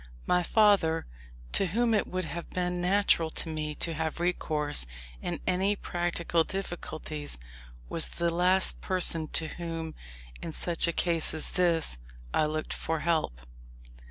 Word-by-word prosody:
My 180 0 +3
father, 185 -5 +3 0.5
to 195 - +4
whom 230 +6 +1
it 210 - +2
would 185 -1 -3
have 165 +3 -6
been 180 -1 -1
natural 180 -3 +3
to - - 0
me 155 -1 -3
to 165 - 0
have 160 +1 -2
recourse 150 - +1 0.3
in - - -3
any 190 +3 +2
practical 175 -3 0
difficulties, 160 - -5 0.5
was 165 - +2
the 170 0 -1
last 180 +2 +2
person 170 -4 +4
to 160 - +1
whom, 165 -2 -5 0.5
in 165 - -5
such 170 +1 +1
a - - +2
case 165 -2 +1
as 155 - -1
this, 165 - +1 0.3
I 155 - +3
looked 155 0 -3
for 160 -1 -2
help. 155 - 0
170 Hz, 145 wpm, -29 LUFS, 160-180 Hz, 0.5 s, to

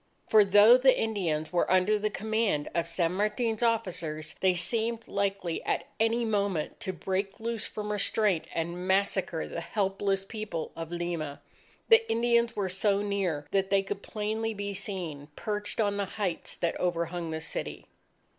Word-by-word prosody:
For 215 -1 +7
though 205 +5 +7
the 260 0 +4
Indians 175 -8 -1
were 175 - +2
under 185 +3 +3
the 215 +1 0
command 215 -8 0
of 170 -1 0
San 170 0 0
Martin's 215 +4 0
officers, 180 -10 -1
they 185 -1 +3
seemed 225 +5 0
likely 195 -4 -1
at - - 0 0.2
any 230 +1 +2
moment, 200 -7 -1
to 215 -5 -2
break 190 +3 -3
loose 230 -1 -2
from 210 0 -5
restraint 205 -3 +1
and 170 +2 -3
massacre 190 -3 +1
the 170 - -5
helpless 195 0 -1
people 205 -7 -5
of 165 0 -6
Lima. 170 -4 -3 0.5
The 455 0 +6
Indians 235 0 +2
were 200 -2 0
so 195 +2 +1
near 190 -8 -1
that 195 -1 +1
they 195 0 +3
could 200 0 -4
plainly 220 +1 -2
be 200 0 -3
seen, 180 -8 -4
perched 210 0 -3
on 205 -2 +2
the 200 - 0
heights 190 -5 -2
that 170 - -1
overhung 170 -1 -1
the 160 0 -3
city. 160 - -5
200 Hz, 160 wpm, -29 LUFS, 175-215 Hz, 0.5 s, For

